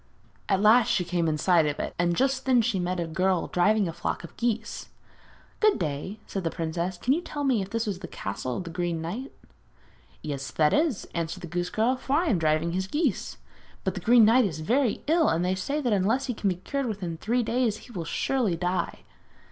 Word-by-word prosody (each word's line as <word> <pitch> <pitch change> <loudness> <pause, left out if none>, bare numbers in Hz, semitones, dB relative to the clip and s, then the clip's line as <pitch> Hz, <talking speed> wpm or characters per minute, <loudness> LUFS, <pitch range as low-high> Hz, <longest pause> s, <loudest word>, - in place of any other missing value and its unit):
At 195 -1 +2
last 220 +2 +6
she 180 - +2
came 170 -1 0
in 155 -1 0
sight 170 -1 +3
of 145 - -3
it, - - -3
and 175 0 +2
just 265 +2 0
then 250 -3 +5
she 220 -4 0
met 180 0 -1
a 170 - -1
girl 185 +2 +1
driving 205 +3 +2
a 165 - -4
flock - - -3
of 170 - -11
geese. 230 -1 -2 0.7
'Good 430 -1 +4
day!' 165 +6 -4
said 195 - -4
the 165 - 0
princess; 170 +2 -3
'can 250 +8 +2
you 330 - 0
tell 290 -4 -5
me 255 -6 +2
if 190 - -5
this 230 +1 -2
is 195 -3 -2
the - - -7
castle 120 +6 -4
of - - -4
the 170 - -7
Green 175 -1 -2
Knight?' 210 +12 -5 0.9
'Yes, 140 -3 -4
that 150 -1 +2
it 300 - +5
is,' 250 -11 -5
answered 170 +1 -3
the - - -6
goose 175 +1 -2
girl, 230 +4 +1
'for 265 - -3
I 325 +5 +3
am 190 - +2
driving 155 +1 +1
his 190 +2 -2
geese. 300 - -1 0.5
But - - -1
the - - -5
Green 235 -1 +6
Knight 235 +3 +5
is 155 -5 -3
very 240 - +1
ill, 320 +1 +3
and 170 +2 +1
they 185 - +1
say 280 +11 -2
that 245 -6 +1
unless 220 +8 +1
he 250 - -2
can 210 -2 0
be 185 - 0
cured 270 +9 -3
within 185 -7 -4
three 235 +7 0
days 230 -1 0
he - - -14
will 180 -7 -4
surely 235 +1 0
die.' 180 +1 -2
190 Hz, 230 wpm, -27 LUFS, 170-240 Hz, 0.9 s, last